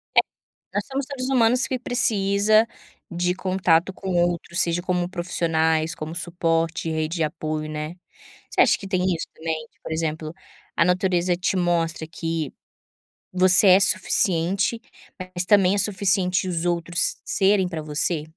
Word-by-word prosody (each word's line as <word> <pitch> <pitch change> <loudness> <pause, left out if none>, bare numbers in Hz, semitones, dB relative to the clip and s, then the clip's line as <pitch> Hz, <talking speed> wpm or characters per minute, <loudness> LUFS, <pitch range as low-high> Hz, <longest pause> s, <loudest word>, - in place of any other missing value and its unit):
É, - - +8 0.5
nós 205 - -2
somos 270 0 -3
seres 265 -2 -5
humanos 250 0 +2
que 260 - -2
precisa 215 -3 +2 0.4
de 180 +1 -1
contato 185 -1 +1
com 190 0 -7
outros 170 0 -2
seja 170 +1 +1
como 180 -1 -1
profissionais, 165 -3 -1
como 155 +2 -7
suporte, 165 -1 -2
rede 160 +2 -2
de 160 - 0
apoio, 155 0 -4
né, 155 +2 -5 0.6
você - - 0
acha - - +5
que 195 - -9
tem 185 -2 -1
isso 165 - -5
também, 160 -1 -4 0.2
por - - -8
exemplo, 155 -1 -3 0.4
a 165 - +3
natureza 180 -1 +1
te 185 +1 -1
mostra 170 -3 -1
que 165 -2 -4 0.8
você 185 +2 +9
é 185 +2 +7
suficiente, 185 +3 +1 0.4
mas 185 -1 -5
também 200 -1 +4
é - - -1
suficiente 190 -2 0
os 170 -1 -3
outros 175 0 0
serem 195 -1 +2
para 160 -3 -5
você? 150 +1 -1
175 Hz, 145 wpm, -23 LUFS, 165-190 Hz, 0.8 s, você